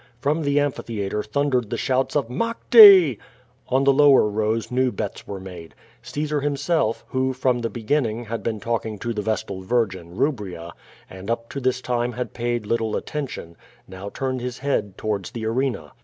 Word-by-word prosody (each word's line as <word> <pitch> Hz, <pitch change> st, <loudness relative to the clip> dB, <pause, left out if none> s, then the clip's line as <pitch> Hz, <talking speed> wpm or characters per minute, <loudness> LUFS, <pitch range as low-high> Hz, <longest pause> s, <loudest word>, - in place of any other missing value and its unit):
From 150 Hz, +5 st, 0 dB
the 140 Hz, -1 st, +2 dB
amphitheatre 110 Hz, -8 st, -2 dB
thundered 125 Hz, 0 st, -1 dB
the 120 Hz, -, -2 dB
shouts 130 Hz, +3 st, 0 dB
of 145 Hz, -5 st, +1 dB
*'Maete!" 200 Hz, -, +7 dB, 0.5 s
On 130 Hz, +2 st, +2 dB
the 140 Hz, 0 st, +5 dB
lower 140 Hz, -4 st, +6 dB
rows 110 Hz, +3 st, -1 dB
new 130 Hz, 0 st, +1 dB
bets 105 Hz, -4 st, -5 dB
were 100 Hz, -1 st, -6 dB
made. 90 Hz, -3 st, -10 dB, 0.3 s
Caesar, 150 Hz, 0 st, -3 dB
himselfi 145 Hz, -3 st, 0 dB
who, 130 Hz, 0 st, 0 dB
from 130 Hz, -1 st, 0 dB
the 115 Hz, -1 st, -2 dB
begiunins; 120 Hz, -1 st, -1 dB
had 115 Hz, +1 st, -4 dB
been 110 Hz, -2 st, -3 dB
talking 110 Hz, 0 st, -3 dB
to 115 Hz, +4 st, -3 dB
the 105 Hz, -, -3 dB
vestal 105 Hz, -3 st, -3 dB
virJin, 95 Hz, -5 st, -2 dB
Kubria, 100 Hz, -, -2 dB, 0.4 s
and 95 Hz, +3 st, -10 dB
up 115 Hz, 0 st, -2 dB
to 140 Hz, -, -5 dB
this 130 Hz, -1 st, 0 dB
time 120 Hz, -1 st, -1 dB
had 125 Hz, +2 st, -5 dB
paid 120 Hz, -2 st, -2 dB
little 115 Hz, 0 st, -1 dB
attention, 135 Hz, -, -5 dB, 0.3 s
now 95 Hz, +2 st, -8 dB
turned 130 Hz, +2 st, -3 dB
his 125 Hz, 0 st, -4 dB
head 110 Hz, -8 st, -2 dB
towards 105 Hz, -4 st, -3 dB
the 115 Hz, -3 st, -6 dB
arena. 130 Hz, +3 st, -2 dB
120 Hz, 170 wpm, -23 LUFS, 105-135 Hz, 0.5 s, Maete